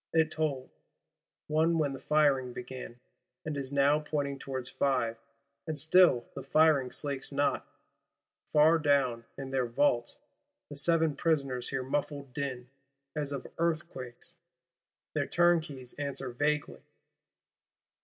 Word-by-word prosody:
It 160 -1 +3
tolled 145 -5 -2 0.7
One 160 +2 +2
when 145 -3 +1
the 135 - -7
firing 135 -3 +2
began; 125 -1 -8 0.5
and 155 -1 -3
is 135 -1 -4
now 140 +1 +4
pointing 145 -2 -2
towards 130 -2 -4
Five, 125 -5 0 0.5
and 155 -1 -2
still 160 -4 +5
the 140 - -6
firing 140 -1 +4
slakes 140 -2 -2
not.—Far 150 +2 0
down, 135 -6 +2
in 135 -1 -6
their 130 -2 +1
vaults, 120 -1 +1 0.5
the 145 - -7
seven 160 +1 +2
Prisoners 140 -7 0
hear 135 -1 -2
muffled 140 0 -3
din 130 -3 -4 0.4
as 145 -2 -1
of 140 -2 -4
earthquakes; 155 -7 -3 0.8
their - - 0
Turnkeys 160 -7 +1
answer 135 -2 -3
vaguely. 150 +4 -1
140 Hz, 120 wpm, -30 LUFS, 130-155 Hz, 0.8 s, still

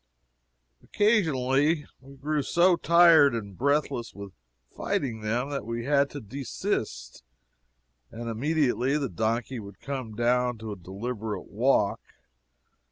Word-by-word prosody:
Occasionally 155 - +1
we 135 +1 -15
grew 150 +2 -1
so 175 +6 +3
tired 170 -6 +6
and 100 -4 -6
breathless 140 -2 -1
with 100 -2 -9 0.4
fighting 115 -5 -2
them 120 +6 -2
that 140 - -3
we 115 +2 -4
had 140 0 +2
to 145 - -7
desist, 105 - -4 0.9
and 115 +1 -7
immediately 135 +1 0
the 140 -4 -2
donkey 115 +6 -2
would 100 -2 -11
come 130 -6 -5
down 125 +1 +1
to 110 0 -7
a - - -5
deliberate 105 +4 -6
walk. 110 -2 +2
125 Hz, 120 wpm, -27 LUFS, 110-145 Hz, 0.9 s, tired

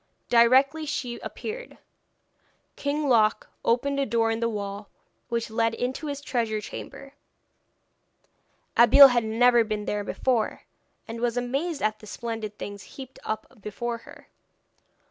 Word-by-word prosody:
Directly 265 +6 +4
she 255 -5 -3
appeared, - - -7 1.0
King 290 +1 -2
Loc 220 -4 +3 0.2
opened 275 +4 +1
a 275 - +1
door 225 -1 +1
in 225 - -2
the 230 0 0
wall 200 -1 -5 0.4
which 235 -2 -2
led 225 0 +1
into 255 +6 -3
his 285 -1 -4
treasure 230 -6 -1
chamber. 275 +5 -9 1.6
Abeille 270 +4 +9
had 240 -2 +1
never 235 +2 +4
been 215 -1 -3
there 205 0 -2
before, 235 +1 -1 0.4
and 230 +1 -6
was 240 0 0
amazed 275 +6 -2
at 215 0 0
the 215 - -13
splendid 225 -1 -5
things 205 -1 -7 0.2
heaped 265 -1 -10
up 215 +1 -6
before 230 +3 -4
her. - - -15
235 Hz, 135 wpm, -26 LUFS, 220-270 Hz, 1.6 s, Abeille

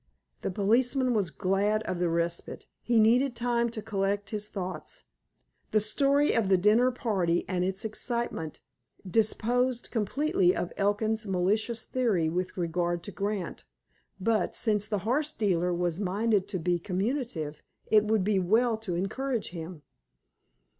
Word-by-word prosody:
The - - -2
policeman 245 +7 +2
was 200 -6 +1
glad 200 +6 0
of 185 - -3
the 175 -1 +1
respite. 170 +1 -2 0.2
He 235 -1 +2
needed 245 +4 +4
time 235 0 +1
to 220 -2 -6
collect 205 -1 -1
his 210 -1 -3
thoughts. 185 -2 -6 0.7
The 215 - +3
story 275 +7 +3
of 220 -4 +1
the 190 - +5
dinner 215 +7 +4
party 195 -9 0
and 180 -1 0
its 190 +4 -2
excitement 220 - -3 0.5
disposed 235 +5 +1
completely 305 - +1
of 175 - -3
Elkin's 215 +2 0
malicious 210 +5 0
theory 215 -11 +1
with 180 +3 -3
regard 175 0 -1
to 205 - -6
Grant, 200 -2 -3 0.6
but, 220 +3 0
since 210 -2 +1
the 210 -2 -1
horse 290 +6 +1
dealer 180 -4 +1
was 175 0 -1
minded 205 +1 +1
to 205 -2 -3
be 175 +1 0
communicative, 185 - -3 0.2
it 215 -1 +4
would 215 -2 +2
be 200 0 +2
well 220 +5 +2
to 210 -6 -4
encourage 230 +6 -2
him. 165 -2 -8
210 Hz, 145 wpm, -28 LUFS, 180-235 Hz, 0.7 s, the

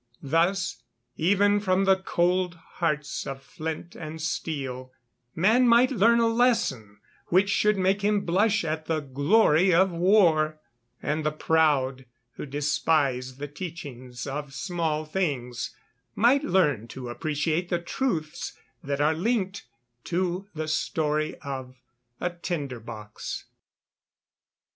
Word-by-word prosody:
Thus, 170 0 +1 0.3
even 205 +4 +3
from 195 -1 +1
the 190 0 +5
cold 180 -1 0
hearts 150 -4 -3
of 135 0 -6
flint 160 +4 -6
and 160 0 -7
steel, 135 -5 -4 0.4
man 225 +9 +4
might 240 +2 +5
learn 235 0 +4
a 230 - +4
lesson 225 - +1 0.3
which 190 +3 +3
should 210 -1 +3
make 190 +1 +2
him 205 0 +2
blush 205 +3 +2
at 155 0 -3
the 160 -1 0
"glory 155 +6 +3
of 185 +2 +4
war;" 170 -4 +3 0.4
and 155 +1 -1
the 155 - +1
proud, 145 -5 +1 0.3
who 135 - -8
despise 140 -3 0
the 145 +1 -5
teachings 135 -6 -7
of 140 0 -5
small 165 -4 -2
things, 140 -8 -2 0.4
might 255 +6 +4
learn 150 - +2
to 125 0 -7
appreciate 155 +6 -1
the 175 - +1
truths 170 - -3 0.3
that 140 0 -2
are 150 +2 +3
linked 195 +2 -1 0.4
to 180 +2 -1
the 155 0 -3
story 155 -1 0
of 130 -2 -6 0.4
a 175 - -1
"tinder 155 -7 -4
box." 110 -2 -7
160 Hz, 125 wpm, -26 LUFS, 145-190 Hz, 0.4 s, the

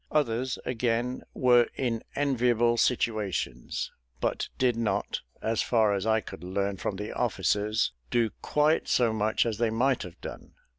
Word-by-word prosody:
Others, 130 -3 0
again, 120 +1 -1
were 120 -2 +5
in 115 -4 -1
enviable 120 -4 +2
situations, 105 - -1 0.3
but - - -1
did 125 -2 +2
not, 115 -1 -1 0.2
as 110 0 +1
far 110 -4 +3
as 100 +2 -1
I 110 0 +3
could 85 - -10
learn 100 +2 -1
from 95 - -3
the 105 +2 -5
officers, 105 +2 +1 0.2
do 115 -3 +2
quite 150 +2 +2
so 120 -3 +3
much 110 +1 +1
as 110 -2 -2
they 120 -1 +2
might 125 +4 +1
have 90 -2 -9
done. - - -9
115 Hz, 150 wpm, -28 LUFS, 105-125 Hz, 0.3 s, were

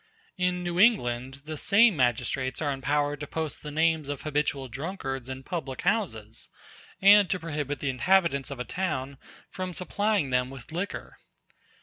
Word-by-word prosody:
In 180 -1 0
New 175 0 -2
England 135 - +2
the 155 0 -5
same 205 +5 +5
magistrates 130 0 0
are 145 -2 0
empowered 145 +2 0
to 145 - -5
post 160 -1 -3
the 150 - -6
names 160 -1 +1
of 145 - -4
habitual 145 -3 -1
drunkards 135 -2 -5
in 130 0 -6
public 135 -5 -4
houses, 170 - -2 0.5
and 205 -1 +8
to 185 - 0
prohibit 150 -3 -4
the 145 - 0
inhabitants 155 0 +2
of 140 -3 -7
a 125 - -3
town 140 -3 -3 0.3
from 185 -1 -4
supplying 200 -5 0
them 125 0 +1
with 135 +1 -11
liquor. 180 +5 -5
150 Hz, 155 wpm, -27 LUFS, 135-180 Hz, 0.5 s, and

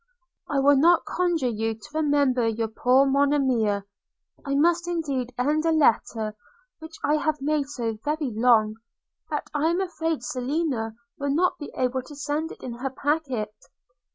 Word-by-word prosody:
'I 280 -2 +1
will 285 +1 +5
not 330 +4 +4
conjure 350 -6 0
you 225 -1 -1
to 215 - -14
remember 285 -6 +2
your 225 0 -1
poor 250 +4 +3
Monimia! 265 -7 +2 0.6
I 275 0 -1
must 340 +4 +2
indeed 280 -8 -2
end 295 +5 +1
a 330 - +2
letter 225 -7 +2 0.4
which 320 0 -10
I 300 +1 +3
have 305 0 -1
made 290 0 0
so 230 -6 -3
very 300 -3 -1
long, 220 -1 +3 0.5
that - - -4
I 300 +1 +1
am 345 +2 +1
afraid 325 -6 -2
Selina 250 -3 -2 0.2
will 285 0 -1
not 360 +3 +1
be 295 - -7
able 255 0 0
to 290 +3 -12
send 295 +3 -2
it - - -12
in 250 - -5
her 270 +1 -2
packet. 265 -6 -2
280 Hz, 160 wpm, -25 LUFS, 245-310 Hz, 0.6 s, will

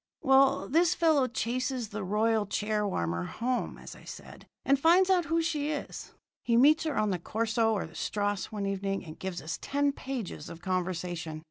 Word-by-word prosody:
"Well, 270 0 +4
this 335 +4 +3
fellow 310 -6 +3
chases 255 -1 -2
the 210 -1 -5
royal 215 +2 +1
chair 210 +1 -1
warmer 85 - -2
home, 245 - -2
as - - -10
I - - -15
said, - - -11 0.2
and 275 0 +3
finds 360 +5 +5
out 360 -3 +3
who 330 +2 +1
she 300 -3 -1
is. 300 -2 -5 0.3
He 235 -1 +2
meets 305 +6 +5
her 310 - -1
on 215 -1 +2
the 180 - -1
corso 225 +4 0
or 205 - -1
the - - -13
strasse 205 -2 -2
one 205 -2 -3
evening 195 0 -2
and 155 -1 -10
gives 185 -2 -5
us 160 +3 -4
ten 285 0 +1
pages 255 - -6
of 165 - -9
conversation. 175 -3 -3
225 Hz, 190 wpm, -29 LUFS, 195-280 Hz, 0.3 s, finds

